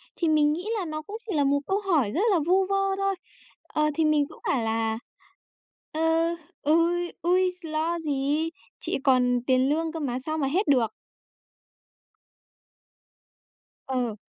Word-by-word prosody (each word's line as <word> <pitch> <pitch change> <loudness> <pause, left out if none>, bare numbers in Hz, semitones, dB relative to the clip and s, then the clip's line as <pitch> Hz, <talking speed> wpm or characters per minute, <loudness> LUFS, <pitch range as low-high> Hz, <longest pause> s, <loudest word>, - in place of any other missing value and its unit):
Thì 335 - 0
mình 300 -1 +4
nghĩ 360 +6 -5
là 365 - -3
nó 310 -1 -4
cũng 410 +8 -7
chỉ - - -1
là 290 - +3
một 285 +1 +2
câu 390 +2 +1
hỏi 310 - +1
rất 350 - 0
là 355 - +3
vu 380 +2 +4
vơ 390 0 +1
thôi, 390 0 0 0.5
ờ, 305 0 +1
thì 320 - +2
mình 300 -1 +3
cũng - - -14
bảo 250 -4 +1
là 225 0 0 0.9
"Ơ, 325 +1 +1 0.3
ôi, 340 +3 +2
ôi 365 +2 +3
s - - -10
lo 320 +2 -1
gì! 295 +1 0 0.3
Chị - - -2
còn 250 -2 +3
tiền 260 0 +3
lương 320 +2 0
cơ 325 - -5
mà 255 -4 -2
sao 315 0 -2
mà 280 - 0
hết 340 +6 0
được." 245 -6 +3 3.0
Ờ. 250 -5 -1
310 Hz, 165 wpm, -26 LUFS, 275-345 Hz, 3.0 s, mình